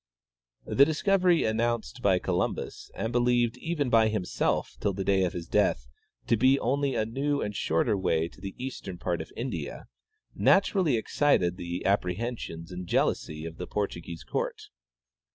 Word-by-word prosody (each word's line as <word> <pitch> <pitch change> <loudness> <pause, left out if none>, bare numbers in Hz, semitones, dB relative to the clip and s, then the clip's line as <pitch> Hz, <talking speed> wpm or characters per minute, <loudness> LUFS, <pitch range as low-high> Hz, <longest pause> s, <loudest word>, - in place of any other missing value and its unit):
" - - -45
The 140 - +8
discovery 180 +3 +3
announced 115 +2 -1
by 95 -4 +4
Columbus, 90 -1 -2
and 115 - -2
believed 120 -1 +2
even 145 -2 -2
b}^ 110 -1 +5
himself 105 -4 -1
till 100 - 0
the 95 +1 -3
day 95 -1 +3
of 90 - -2
his 85 -1 -6
death 65 -5 +1 0.4
to - - +3
be 130 +4 +4
only 140 +2 0
a 110 - +1
new 140 +5 -1
and 105 0 -4
shorter 80 +5 +1
way 80 -4 +1
to 90 - -18
the 95 -1 -6
eastern 125 -8 -6
part 85 -1 -2
of - - -9
India, - - -4 0.5
naturally 180 - +3
excited 110 -7 +2
the 85 -1 -5
appre 90 -3 +1
hensions 110 -8 -5
and 90 0 -6
jealousy 75 -1 0
of 80 0 -7
the - - -5
Portuguese 85 -7 -4
court. - - -3
105 Hz, 165 wpm, -28 LUFS, 90-125 Hz, 0.5 s, The